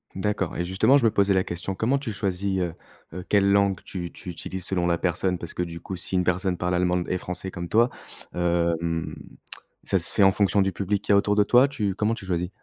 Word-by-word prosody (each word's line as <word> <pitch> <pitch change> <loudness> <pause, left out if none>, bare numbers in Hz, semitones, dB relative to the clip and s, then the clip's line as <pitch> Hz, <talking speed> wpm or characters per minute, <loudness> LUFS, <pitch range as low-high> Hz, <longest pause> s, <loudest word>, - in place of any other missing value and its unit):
D'accord 95 -2 -1
et 85 - 0
justement 100 +9 +4
je 135 - 0
me 110 - +4
posais 100 -1 +3
la 95 -1 +2
question. 90 +2 -4
Comment 120 +7 +1
tu 135 -5 -4
choisis, 95 -1 -1
heu 85 -2 -1 0.4
heu, 90 0 -6
quelle 100 -1 +3
langue 100 -1 +3
tu 85 -3 -6
tu - - -10
utilises 90 +1 -6
selon 90 -2 0
la 85 0 +2
personne? 90 +1 0
Parce 85 -1 -8
que, - - -3
du 85 -1 -6
coup, 95 - -6
si 95 - -4
une 90 - +3
personne 90 +1 0
parle 90 +1 0
allemand 90 0 +2
d 90 - -3
et - - +1
français 90 +1 -4
comme 85 -1 -5
toi, 115 +5 +4 0.4
hem, 85 -1 0 0.7
ça - - +1
se - - +1
fait 100 - +4
en 95 - +7
fonction 100 0 +2
du 95 0 +1
public 100 +1 -1
qu'il - - -1
y - - +7
a - - +6
autour 105 0 +2
de 105 - +5
toi? 125 +6 +5
Tu 110 -9 -2
comment 105 +3 0
tu 100 - -10
choisis? 90 -1 -1
95 Hz, 250 wpm, -25 LUFS, 90-100 Hz, 0.7 s, en